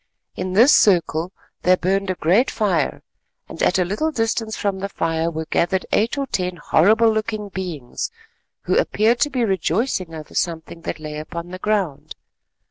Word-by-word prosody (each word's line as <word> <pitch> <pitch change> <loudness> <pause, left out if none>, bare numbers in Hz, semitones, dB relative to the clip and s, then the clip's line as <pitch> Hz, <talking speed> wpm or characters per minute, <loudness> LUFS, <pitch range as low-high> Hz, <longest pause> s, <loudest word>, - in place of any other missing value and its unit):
In 185 0 -3
this 235 +9 +7
circle 170 -3 +3 0.3
there 185 0 +4
burned 195 +2 0
a 185 - 0
great 180 - +3
fire, 185 -9 0 0.4
and - - -8
at 180 - +3
a 180 - +2
little 215 - -1
distance 225 -3 -1
from 200 -2 -1
the 200 +1 -3
fire 165 -2 -1
were 160 -1 -4
gathered 180 +4 0
eight 225 +6 +1
or 280 - 0
ten 180 -7 -2
horrible 215 +8 +4
looking 215 -1 -3
beings, 175 -10 -5 0.5
who - - 0
appeared 230 +3 +2
to 295 - +2
be 255 -4 0
rejoicing 190 -2 -1
over 155 -1 -9
something 165 -1 -3
that 165 - -5
lay 150 -1 -6
upon 170 +2 -7
the 185 - -7
ground. 195 -9 -2
185 Hz, 170 wpm, -21 LUFS, 165-215 Hz, 0.5 s, this